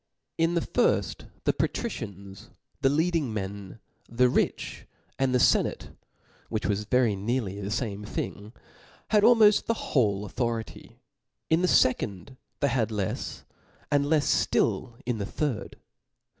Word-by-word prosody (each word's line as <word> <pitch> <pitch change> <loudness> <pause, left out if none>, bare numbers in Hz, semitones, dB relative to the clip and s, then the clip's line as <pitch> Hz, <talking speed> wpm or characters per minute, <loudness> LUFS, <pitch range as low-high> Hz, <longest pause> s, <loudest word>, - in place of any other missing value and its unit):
In 165 +1 +2
the 170 - +2
firft - - 0 0.2
the - - +2
patricians, 100 0 -4 0.3
the 135 - +4
leading 160 -2 +1
men, 100 -1 -5 0.3
the 125 +2 +3
rich, - - -1 0.3
and 135 -1 +2
the 125 - +3
fenate, - - +2 0.6
which 110 -2 -2
was 105 +1 0
very 120 -2 +2
near 100 -1 -2
the 100 - -4
fame 105 -1 -3
thing, 105 0 -5 0.6
had 210 -1 +4
almoft 220 -2 +5
the 230 - +1 0.2
whole 105 -6 +2
authority; 115 0 -4 0.5
in 160 +2 +4
the 180 - +3
fe 130 -7 +5
cond 100 +2 -7 0.3
they 140 - +3
had 120 -5 +1
lefs; 105 -4 -3 0.5
and 145 -1 +2
lefs 150 -1 +2
ftill 120 -2 0
in 120 -2 -1
the 100 - -2
third. 130 -9 -3
120 Hz, 140 wpm, -27 LUFS, 100-145 Hz, 0.6 s, almoft